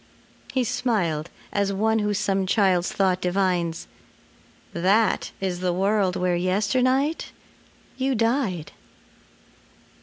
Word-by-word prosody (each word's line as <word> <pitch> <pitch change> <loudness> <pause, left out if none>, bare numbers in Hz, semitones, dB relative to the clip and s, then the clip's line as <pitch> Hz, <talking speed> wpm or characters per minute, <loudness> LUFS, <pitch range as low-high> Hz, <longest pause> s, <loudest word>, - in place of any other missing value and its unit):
He 260 - +1
smiled 175 -11 -1 0.2
as 200 -1 +1
one 220 +3 +1
who 210 -1 0
some 195 -2 0
child's 185 -3 +2
thought 185 -2 +1
divines: 180 -3 0 0.9
"That 195 +5 +2
is 185 -2 -2
the 180 -1 0
world 195 0 +1
where 180 -1 +1
yesternight 250 - +1 0.7
you 265 0 0
died." 225 - 0
195 Hz, 100 wpm, -24 LUFS, 180-220 Hz, 0.9 s, child's